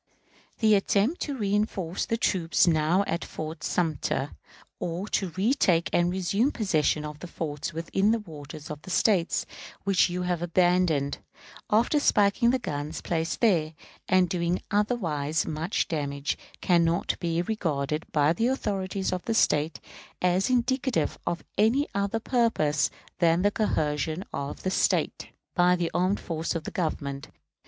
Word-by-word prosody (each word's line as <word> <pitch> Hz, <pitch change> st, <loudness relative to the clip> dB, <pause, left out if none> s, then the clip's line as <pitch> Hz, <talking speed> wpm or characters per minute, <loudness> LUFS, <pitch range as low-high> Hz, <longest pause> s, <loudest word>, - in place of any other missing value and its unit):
The 220 Hz, -2 st, +4 dB
attempt 205 Hz, -, +2 dB
to 285 Hz, -2 st, -3 dB
reënforce 200 Hz, -4 st, -1 dB
the 230 Hz, -, 0 dB
troops 180 Hz, -7 st, +2 dB
now 165 Hz, +3 st, +3 dB
at 170 Hz, -, -2 dB
Fort 160 Hz, +1 st, -6 dB
Sumter, 160 Hz, -6 st, -1 dB, 0.5 s
or 175 Hz, +4 st, -3 dB
to 190 Hz, -, 0 dB
retake 190 Hz, -6 st, +2 dB
and 175 Hz, 0 st, +3 dB
resume 195 Hz, +8 st, +1 dB
possession 155 Hz, -, +1 dB
of 150 Hz, 0 st, -7 dB
the 180 Hz, -, -7 dB
forts 155 Hz, 0 st, -4 dB
within 170 Hz, +5 st, 0 dB
the 230 Hz, -, +3 dB
waters 155 Hz, -6 st, -9 dB
of 150 Hz, 0 st, -7 dB
this 185 Hz, -, -3 dB
State, 185 Hz, -6 st, +2 dB, 0.4 s
which 190 Hz, -2 st, +3 dB
you 180 Hz, +1 st, -2 dB
have 180 Hz, -2 st, -1 dB
abandoned, 175 Hz, -4 st, +2 dB, 0.5 s
after 235 Hz, +8 st, +3 dB
spiking 210 Hz, -2 st, +3 dB
the 260 Hz, -, +3 dB
guns 150 Hz, -, -4 dB
placed 165 Hz, 0 st, -2 dB
there, 165 Hz, -9 st, +2 dB, 0.3 s
and 185 Hz, -1 st, +4 dB
doing 175 Hz, -1 st, -1 dB
otherwise 170 Hz, -, 0 dB
much 160 Hz, +5 st, -1 dB
damage, 140 Hz, -3 st, -2 dB, 0.3 s
can 175 Hz, -2 st, +4 dB
not 165 Hz, +1 st, 0 dB
be 170 Hz, 0 st, 0 dB
regarded 155 Hz, -7 st, -2 dB
by 150 Hz, +1 st, +3 dB
the 225 Hz, +7 st, +1 dB
authorities 195 Hz, -7 st, -1 dB
of 180 Hz, -, -3 dB
this 225 Hz, -1 st, 0 dB
State 150 Hz, -3 st, +2 dB, 0.4 s
as 180 Hz, +3 st, +2 dB
indicative 250 Hz, -, 0 dB
of 170 Hz, -, -2 dB, 0.2 s
any 240 Hz, +8 st, +3 dB
other 200 Hz, +3 st, 0 dB
purpose 220 Hz, -, +1 dB, 0.3 s
than 170 Hz, +1 st, +3 dB
the 205 Hz, -, +3 dB
coercion 155 Hz, -5 st, -1 dB
of 140 Hz, +1 st, -5 dB
the 185 Hz, -, 0 dB
State -, -, +1 dB, 0.3 s
by 180 Hz, 0 st, +4 dB
the 175 Hz, -2 st, -2 dB
armed 185 Hz, +3 st, +1 dB
force 165 Hz, 0 st, -3 dB
of 165 Hz, -, -2 dB
the -, -, -6 dB
Government. 140 Hz, -5 st, -3 dB
175 Hz, 150 wpm, -27 LUFS, 160-205 Hz, 0.5 s, The